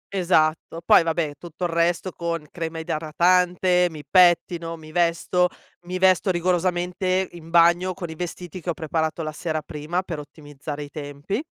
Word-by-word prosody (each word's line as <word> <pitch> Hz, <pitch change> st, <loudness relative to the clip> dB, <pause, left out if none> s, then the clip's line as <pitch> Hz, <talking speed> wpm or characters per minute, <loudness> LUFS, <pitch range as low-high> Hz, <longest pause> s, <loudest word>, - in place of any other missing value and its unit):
Esatto 165 Hz, -2 st, +1 dB
poi -, -, +7 dB
vabbè, 165 Hz, -2 st, -1 dB
tutto 175 Hz, 0 st, -9 dB
il 175 Hz, -, 0 dB
resto 170 Hz, +2 st, +1 dB
con 170 Hz, -3 st, -4 dB
crema 165 Hz, -1 st, -5 dB
idratante, 180 Hz, +3 st, +2 dB
mi 155 Hz, -2 st, -10 dB
pettino, 175 Hz, -2 st, +3 dB
mi 155 Hz, -1 st, -13 dB
vesto, 175 Hz, +1 st, +2 dB, 0.4 s
mi 185 Hz, +1 st, -3 dB
vesto 185 Hz, 0 st, +3 dB
rigorosamente 180 Hz, +1 st, 0 dB
in 165 Hz, -1 st, -12 dB
bagno, 175 Hz, +2 st, +4 dB
con 175 Hz, -4 st, -6 dB
i -, -, -8 dB
vestiti 175 Hz, +1 st, -6 dB
che 175 Hz, -, -5 dB
ho -, -, +1 dB
preparato 160 Hz, +1 st, -2 dB
la 155 Hz, -, -3 dB
sera 155 Hz, -1 st, -3 dB
prima, 160 Hz, +5 st, -3 dB
per 165 Hz, -5 st, -5 dB
ottimizzare 145 Hz, 0 st, -8 dB
i 145 Hz, -, -10 dB
tempi. 145 Hz, -, -4 dB
170 Hz, 160 wpm, -23 LUFS, 160-180 Hz, 0.4 s, poi